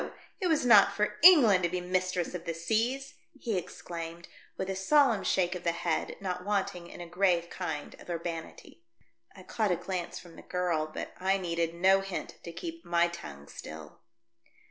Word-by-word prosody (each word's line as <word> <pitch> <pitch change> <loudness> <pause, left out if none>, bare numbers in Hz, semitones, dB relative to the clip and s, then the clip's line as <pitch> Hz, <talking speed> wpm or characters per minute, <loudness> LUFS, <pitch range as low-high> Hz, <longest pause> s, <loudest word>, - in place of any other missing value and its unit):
It 370 - 0
was 315 -6 +2
not 215 -5 +7
for 210 0 0
England 275 - +8
to 175 - +1
be 180 +1 -2
mistress 180 -1 -1
of 175 -2 -6
the 165 - -3
seas!" 235 - -1 0.3
he 230 -5 -2
exclaimed, 170 -1 -6 0.3
with 190 - -3
a 190 - -2
solemn 230 +1 +3
shake 180 -1 +1
of 180 - -6
the 170 - +1
head, 170 -1 -2
not 180 -2 -4
wanting 190 -3 -2
in - - -10
a - - -6
grave 175 -1 +1
kind 160 -5 -4
of - - -14
urbanity. 170 - -6 0.5
I - - -12
caught 215 -3 -1
a 180 - +3
glance 180 0 -4
from 175 -2 -12
the - - -10
girl, 170 -4 -1
but - - -6
I 190 +1 +2
needed 170 -2 -2
no 190 +3 +5
hint 195 -1 -6
to 170 - -7
keep 165 -1 -7
my 170 0 +2
tongue 70 - -9
still. 80 +1 -10
180 Hz, 185 wpm, -30 LUFS, 170-195 Hz, 0.5 s, England